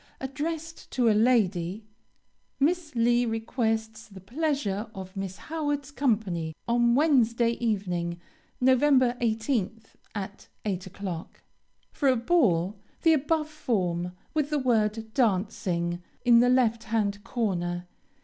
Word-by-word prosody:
Addressed 315 Hz, +5 st, -5 dB
to 240 Hz, -3 st, +3 dB
a -, -, +4 dB
lady: 210 Hz, -4 st, +2 dB, 0.7 s
Miss 310 Hz, +1 st, +1 dB
Lee 240 Hz, +1 st, +3 dB
requests 225 Hz, -1 st, -2 dB
the 195 Hz, -3 st, -12 dB
pleasure 230 Hz, -, -2 dB
of 190 Hz, 0 st, -8 dB
Miss 195 Hz, -1 st, -4 dB
Howard's 290 Hz, -3 st, -3 dB
company 200 Hz, -, -1 dB
on 235 Hz, 0 st, +3 dB
Wednesday 245 Hz, -6 st, +3 dB
evening, 180 Hz, -7 st, -2 dB, 0.4 s
Nov. 255 Hz, 0 st, +4 dB
18th, 240 Hz, -5 st, +1 dB, 0.2 s
at 200 Hz, -1 st, -6 dB, 0.2 s
8 190 Hz, -3 st, -2 dB
o'clock. 185 Hz, -3 st, -7 dB, 0.5 s
For 280 Hz, -, +1 dB
a 260 Hz, -, +4 dB
ball, 215 Hz, -, +2 dB, 0.2 s
the 325 Hz, -, +6 dB
above 305 Hz, +1 st, +1 dB
form, 180 Hz, -, -1 dB, 0.2 s
with 305 Hz, -2 st, 0 dB
the 300 Hz, -, +1 dB
word 220 Hz, -4 st, 0 dB
Dancing, 185 Hz, -6 st, 0 dB, 0.2 s
in 235 Hz, -1 st, +7 dB
the 245 Hz, +1 st, +4 dB
left 235 Hz, -3 st, +2 dB
hand 205 Hz, -2 st, -1 dB
corner. 175 Hz, -6 st, -2 dB
225 Hz, 120 wpm, -27 LUFS, 195-260 Hz, 0.7 s, in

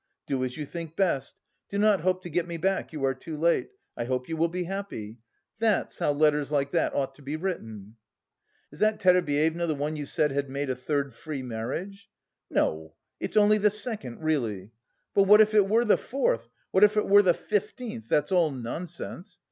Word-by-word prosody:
Do 130 Hz, -2 st, -1 dB
as 125 Hz, +2 st, -4 dB
you 150 Hz, -, -4 dB
think 165 Hz, +1 st, -7 dB
best. 170 Hz, -9 st, 0 dB, 0.3 s
Do 200 Hz, -, -3 dB
not 210 Hz, -3 st, +4 dB
hope 185 Hz, +1 st, 0 dB
to 175 Hz, -, -6 dB
get 175 Hz, +2 st, 0 dB
me 170 Hz, -1 st, -4 dB
back, 190 Hz, +3 st, -1 dB
you 150 Hz, -4 st, -5 dB
are 135 Hz, -, +2 dB
too 155 Hz, +4 st, -8 dB
late. 170 Hz, -, +2 dB, 0.3 s
I 120 Hz, -, -3 dB
hope 125 Hz, 0 st, -2 dB
you 165 Hz, -, -3 dB
will 165 Hz, +1 st, +2 dB
be 180 Hz, +2 st, -3 dB
happy.' 175 Hz, -, -6 dB, 0.4 s
That's 220 Hz, -3 st, +1 dB
how -, -, +2 dB
letters 150 Hz, -1 st, +2 dB
like 140 Hz, -1 st, 0 dB
that -, -, +1 dB
ought 135 Hz, -1 st, -1 dB
to 145 Hz, -, -18 dB
be 140 Hz, +2 st, -4 dB
written!" 110 Hz, -, -5 dB, 0.7 s
"Is 150 Hz, -, -14 dB
that 215 Hz, 0 st, +2 dB
Terebyeva 170 Hz, -2 st, +2 dB
the 155 Hz, -, 0 dB
one 150 Hz, +2 st, -2 dB
you 145 Hz, -2 st, -5 dB
said 150 Hz, -1 st, +1 dB
had 140 Hz, 0 st, -2 dB
made 140 Hz, 0 st, -2 dB
a -, -, -2 dB
third 140 Hz, +1 st, -2 dB
free 145 Hz, +1 st, -6 dB
marriage?" 135 Hz, -, -5 dB, 0.4 s
"No, 80 Hz, 0 st, -1 dB, 0.2 s
it's -, -, -3 dB
only 210 Hz, 0 st, +5 dB
the 210 Hz, +1 st, +4 dB
second, 205 Hz, -, -5 dB
really! 115 Hz, -11 st, -1 dB, 0.4 s
But 200 Hz, -, +5 dB
what 210 Hz, +2 st, +8 dB
if 215 Hz, 0 st, +5 dB
it 205 Hz, -2 st, +4 dB
were 230 Hz, +3 st, +3 dB
the 215 Hz, -, +5 dB
fourth, 115 Hz, -, -1 dB, 0.2 s
what 190 Hz, -, +4 dB
if 210 Hz, +1 st, +5 dB
it 210 Hz, -, +2 dB
were 205 Hz, +1 st, +7 dB
the 180 Hz, -4 st, +3 dB
fifteenth, 210 Hz, -, -3 dB
that's 150 Hz, +4 st, +1 dB
all 175 Hz, -4 st, +4 dB
nonsense! 170 Hz, -, -7 dB
160 Hz, 205 wpm, -27 LUFS, 135-195 Hz, 0.7 s, what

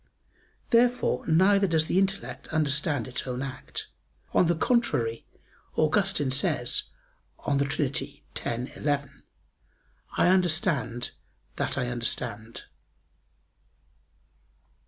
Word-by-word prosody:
Therefore 245 Hz, +1 st, +3 dB
neither 195 Hz, +4 st, +4 dB
does 160 Hz, -2 st, +2 dB
the 180 Hz, -, +2 dB
intellect 195 Hz, 0 st, -2 dB
understand 145 Hz, -4 st, +1 dB
its 130 Hz, +1 st, -4 dB
own 125 Hz, +1 st, -3 dB
act. 130 Hz, -1 st, -6 dB, 0.5 s
On 180 Hz, -, +4 dB
the 170 Hz, -, +2 dB
contrary, 155 Hz, -, +1 dB, 0.5 s
Augustine 155 Hz, -3 st, +2 dB
says 135 Hz, +2 st, +1 dB, 0.6 s
(De 140 Hz, 0 st, +2 dB, 0.7 s
Trin. 120 Hz, +2 st, -2 dB
x, -, -, -14 dB
11), 145 Hz, -2 st, -2 dB, 1.0 s
"I -, -, +4 dB
understand 155 Hz, -, +2 dB, 0.5 s
that -, -, -1 dB
I 125 Hz, -, -1 dB
understand." 115 Hz, -2 st, -3 dB
150 Hz, 95 wpm, -27 LUFS, 125-185 Hz, 1.0 s, neither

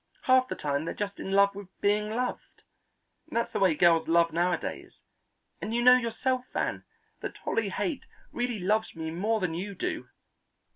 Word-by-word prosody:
Half 255 Hz, 0 st, +4 dB
the -, -, -4 dB
time 145 Hz, +1 st, -2 dB
they're -, -, -4 dB
just 200 Hz, -1 st, -4 dB
in 190 Hz, -, -5 dB
love 200 Hz, 0 st, +5 dB
with 200 Hz, -1 st, -8 dB
being 210 Hz, +1 st, +1 dB
loved. 245 Hz, +3 st, -4 dB, 0.7 s
That's 235 Hz, -6 st, -1 dB
the -, -, -2 dB
way 190 Hz, -4 st, +4 dB
most 150 Hz, -, -10 dB
girls 170 Hz, -2 st, +5 dB
love 165 Hz, 0 st, +3 dB
nowadays, 175 Hz, +1 st, -2 dB, 0.6 s
and 225 Hz, -, -3 dB
you 240 Hz, -, +1 dB
know 250 Hz, +1 st, +9 dB
yourself, 250 Hz, +1 st, -1 dB
Van, -, -, -1 dB, 0.4 s
that -, -, -6 dB
Dolly 225 Hz, -3 st, 0 dB
Haight 285 Hz, -, -2 dB, 0.3 s
really 240 Hz, -1 st, -2 dB
loves 210 Hz, +3 st, 0 dB
me 160 Hz, -1 st, -4 dB
more 210 Hz, +7 st, 0 dB
than 180 Hz, -4 st, -1 dB
you 195 Hz, +4 st, -4 dB
do." 360 Hz, -, -3 dB
205 Hz, 180 wpm, -28 LUFS, 175-235 Hz, 0.7 s, know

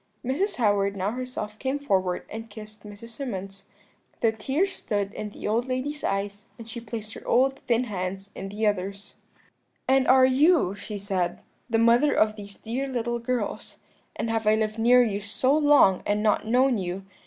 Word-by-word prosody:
"Mrs. 345 Hz, -, 0 dB
Howard 200 Hz, -3 st, +1 dB
now 195 Hz, +2 st, -1 dB
herself 250 Hz, -4 st, -6 dB
came 265 Hz, +1 st, -1 dB
forward 190 Hz, -10 st, 0 dB
and 225 Hz, +1 st, -8 dB
kissed 215 Hz, 0 st, -11 dB
Mrs. 210 Hz, +2 st, -11 dB
Symonds. 195 Hz, -6 st, -6 dB, 0.6 s
The 225 Hz, -, +4 dB
tears 275 Hz, -, -1 dB
stood 205 Hz, -1 st, -2 dB
in 210 Hz, -, -5 dB
the 205 Hz, -, -7 dB
old 230 Hz, +4 st, 0 dB
lady's 265 Hz, +4 st, -3 dB
eyes, 200 Hz, +2 st, -3 dB
and 230 Hz, -2 st, -10 dB
she 235 Hz, +1 st, -7 dB
placed 225 Hz, -2 st, -6 dB
her -, -, -11 dB
old 265 Hz, +2 st, +3 dB
thin 235 Hz, 0 st, +2 dB
hands 195 Hz, -2 st, -5 dB
in 195 Hz, -, -6 dB
the 210 Hz, +2 st, -2 dB
other's. 200 Hz, 0 st, -2 dB, 0.7 s
"'And 265 Hz, 0 st, +3 dB
are 260 Hz, 0 st, +7 dB
you,' 275 Hz, -, +4 dB
she 205 Hz, +1 st, -7 dB
said, 190 Hz, -3 st, -2 dB, 0.3 s
'the 225 Hz, -, +2 dB
mother 235 Hz, +6 st, +4 dB
of 215 Hz, 0 st, +3 dB
these 200 Hz, -2 st, -10 dB
dear 250 Hz, +5 st, -3 dB
little 240 Hz, -2 st, -2 dB
girls? 245 Hz, +1 st, -3 dB, 0.4 s
and 230 Hz, -, -2 dB
have 225 Hz, -1 st, -1 dB
I 215 Hz, -, +5 dB
lived 220 Hz, 0 st, -1 dB
near 245 Hz, +2 st, +6 dB
you 205 Hz, -3 st, -2 dB
so 255 Hz, +7 st, +1 dB
long 290 Hz, -11 st, +5 dB
and 210 Hz, +1 st, 0 dB
not 215 Hz, 0 st, +1 dB
known 250 Hz, 0 st, +3 dB
you? 185 Hz, +1 st, -4 dB
220 Hz, 180 wpm, -26 LUFS, 200-255 Hz, 0.7 s, are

